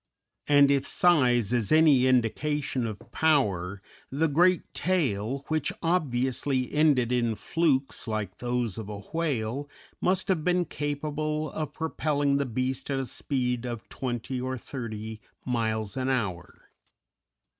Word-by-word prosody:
And 145 -1 +6
if 140 -1 +1
size 125 - +3
is 120 -4 +1
any 155 -5 +6
indication 130 +1 +1
of 110 +2 -8
power, 100 - +1 0.3
the 155 +4 +1
great 175 +4 +3
tail, 140 - -1
which 155 -2 0
obviously 130 -5 0
ended 145 -6 +3
in 120 -2 +1
flukes 140 -2 0
like 105 -4 -3
those 120 -3 -2
of 105 -2 -7
a 105 - -5 0.2
whale, 145 -4 -1 0.3
must 185 +1 +2
have 175 -5 +1
been 180 0 +2
capable 150 +1 -3
of 155 -2 -4
propelling 145 -3 0
the 140 -1 -1
beast 130 +3 -2
at 135 - 0
a 135 - -1
speed 125 -2 -1
of 120 -2 -6
twenty 125 0 -3
or 130 0 -3
thirty 110 -4 -6 0.2
miles 110 -4 -1
an 130 0 -1
hour. 95 -9 -3
130 Hz, 135 wpm, -27 LUFS, 115-150 Hz, 0.3 s, And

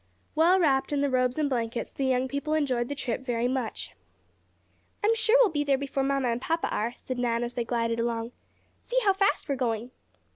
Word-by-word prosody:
Well 340 +4 +4
wrapped 275 -6 +2
in 285 -1 +1
the 285 -1 +1
robes 255 0 +1
and 305 -2 +1
blankets, 235 -3 -2
the 275 - -2
young 260 0 +1
people 285 +3 -2
enjoyed 255 -6 0
the 285 - -3
trip 245 -3 -3
very 240 -2 -1
much. 255 -3 -3 1.1
"I'm 435 +2 +4
sure 455 +1 +3
we'll 465 -7 +5
be 295 -2 0
there 280 -2 +2
before 275 0 -2
papa 275 +1 +1
and 245 -3 0
mamma 330 +4 0
are," 230 +3 -1
said 255 -1 -6
Nan 235 -1 0
as 240 0 -4
they 240 - -1
glided 230 -1 -1
along. 230 0 -2 0.5
"See - - -4
how 395 -2 +4
fast 395 -3 +1
we 285 - 0
are - - -1
going." 240 -1 -2
265 Hz, 215 wpm, -27 LUFS, 240-295 Hz, 1.1 s, we'll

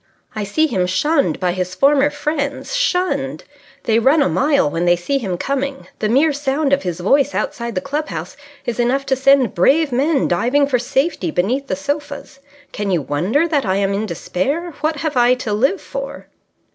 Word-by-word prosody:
I 210 -1 -2
see 310 +11 +1
him 185 -12 0
shunned 285 - +1
by 180 -1 +1
his 185 0 -3
former 280 +6 +4
friends. 290 - -3
Shunned! 370 -7 0 0.4
They 225 0 +2
run 280 +6 +4
a - - +1
mile 280 - +2
when 165 +4 -1
they 175 0 +5
see 275 +11 -1
him 190 -7 -3
coming. 275 +4 -3
The 215 - 0
mere 285 +6 +3
sound 280 0 0
of 280 - +3
his 180 -1 -4
voice 275 +10 +2
outside 235 -2 -3
the 185 - -1
club 295 +2 -3
house - - -6 0.3
is 240 0 -3
enough 260 +3 +1
to 265 - +1
send 265 -3 +3
brave 280 - +3
men 275 +3 +1
diving 250 +11 +2
for 265 -3 0
safety 265 - -1
beneath 240 - -1
the - - -1
sofas. 285 +5 -5 0.3
Can 205 -1 -3
you 175 -6 0
wonder 190 - 0
that 295 -4 +1
I 190 -2 0
am 200 0 0
in 210 +2 -2
despair? 275 - -2
What 310 +1 0
have 315 -3 -2
I 245 0 +4
to 230 -4 -4
live 270 - +1
for?" - - -7
270 Hz, 195 wpm, -19 LUFS, 200-290 Hz, 0.4 s, they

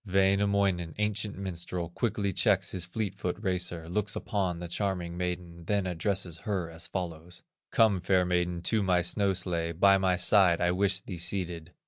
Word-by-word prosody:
Wainamoinen, 95 -3 +1
ancient 105 -1 -1
minstrel, 90 -2 -3
Quickly 100 0 -1
checks 95 -1 +2
his 90 -2 -4
fleet 100 +1 -3
foot 90 -2 -3
racer, 90 -4 -2
Looks 105 +4 -1
upon 95 -6 -1
the 85 +1 -6
charming 90 -1 -2
maiden, 90 -1 -4
Then 100 0 0
addresses 90 -1 -1
her 95 -7 -3
as 80 +1 -4
follows: 85 -2 -5 0.3
"Come, 105 -5 +4
fair 90 0 +2
maiden, 90 -1 -1
to 110 +3 +2
my 90 -3 +2
snow 100 +2 +1
sledge, 85 -3 -2
By 100 0 +6
my 95 -1 +2
side 90 -1 +4
I 90 0 +2
wish 95 +1 +1
thee 90 -3 -7
seated." 85 -2 -2
90 Hz, 165 wpm, -29 LUFS, 85-100 Hz, 0.3 s, By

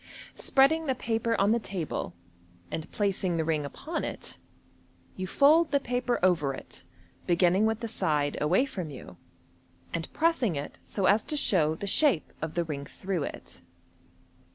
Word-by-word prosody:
Spreading 305 +4 +3
the 265 - +1
paper 230 -1 -1
on 200 +2 +4
the 235 - +3
table, 170 - -4 0.6
and 160 +1 -5
placing 195 -4 0
the 160 - 0
ring 155 -2 0
upon 310 - -4
it, - - -6 0.8
you 185 0 -4
fold 305 - +5
the 280 - +2
paper 245 -1 -1
over 155 -7 +3
it, - - -12 0.5
beginning 180 +4 +4
with 220 +1 -1
the 230 - -2
side 150 -9 0
away 180 - +3
from 190 - -5
you, 125 -10 -10 0.8
and 165 -1 -3
pressing 305 - +1
it 140 +1 -6
so 195 - -1
as 205 +3 +4
to 300 - -3
show 160 - +2
the 200 - -6
shape 200 - +2
of 160 0 -4
the 175 - +1
ring 140 -3 -5
through 185 -3 -3
it. - - -9
195 Hz, 160 wpm, -28 LUFS, 160-245 Hz, 0.8 s, fold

